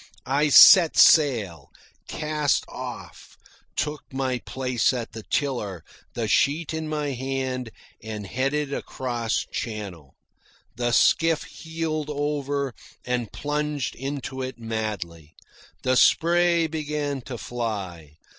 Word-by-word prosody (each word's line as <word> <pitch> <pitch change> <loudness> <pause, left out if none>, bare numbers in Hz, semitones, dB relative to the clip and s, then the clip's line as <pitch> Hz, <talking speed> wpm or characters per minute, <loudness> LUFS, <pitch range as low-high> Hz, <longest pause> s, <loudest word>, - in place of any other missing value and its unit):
I 145 +3 +2
set 175 +2 +9
sail, 105 - +4 0.4
cast 150 -1 0
off, - - -9 0.4
took 150 0 -2
my 130 -2 -1
place 130 -1 0
at 120 -2 -4
the 110 - -8
tiller, 105 - -2 0.3
the - - -2
sheet 150 +2 +1
in 160 -1 -3
my 150 -1 -2
hand, 130 -2 -3 0.3
and 110 -2 -6
headed 135 +7 -1
across 120 -5 -2
channel. 95 - -6 0.6
The 120 +1 -1
skiff 160 +6 +3
heeled 160 -2 -4
over 145 -2 -2 0.3
and 125 -3 -2
plunged 150 -2 -2
into 135 0 -5
it 130 -2 -5
madly. 105 -9 -5 0.5
The 130 0 +2
spray 170 +4 +4
began 150 -3 -3
to 125 - -5
fly. 95 -11 -5
130 Hz, 110 wpm, -25 LUFS, 115-150 Hz, 0.6 s, set